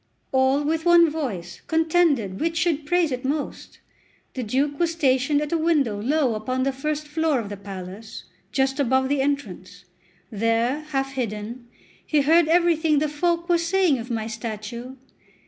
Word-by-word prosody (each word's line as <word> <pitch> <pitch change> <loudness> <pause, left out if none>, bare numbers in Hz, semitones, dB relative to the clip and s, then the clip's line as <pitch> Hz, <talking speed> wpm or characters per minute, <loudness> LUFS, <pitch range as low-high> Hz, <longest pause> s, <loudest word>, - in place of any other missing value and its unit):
All 265 +2 +2
with 320 +2 -1
one 340 -2 +6
voice 210 - -5
contended 320 - +2
which 330 +1 -1
should 315 -3 0
praise 350 -2 +2
it 255 0 -3
most. 285 +2 -4 0.6
The 260 - -4
Duke 275 +5 -1
was 340 -1 +2
stationed 285 -1 +2
at 300 - -6
a 335 - +1
window 285 -11 +1
low 270 +1 +1
upon 255 +4 -2
the 275 - +1
first 300 +3 -3
floor 305 -2 0
of 210 -3 -5
the 205 - -5
palace, 195 +2 -9 0.3
just 270 +1 0
above 265 0 +2
the 285 -1 +1
entrance; 200 -10 -4 0.5
there, 230 +7 0
half 270 -2 -1
hidden, 235 -1 -5 0.4
he 300 -2 +2
heard 320 +3 +4
everything 325 -2 +3
the 305 +2 +2
folk 340 +3 -1
were 345 -2 +3
saying 335 -4 +2
of 230 +2 -7
my 225 -2 -2
statue. 230 +2 -6
275 Hz, 165 wpm, -24 LUFS, 230-315 Hz, 0.6 s, one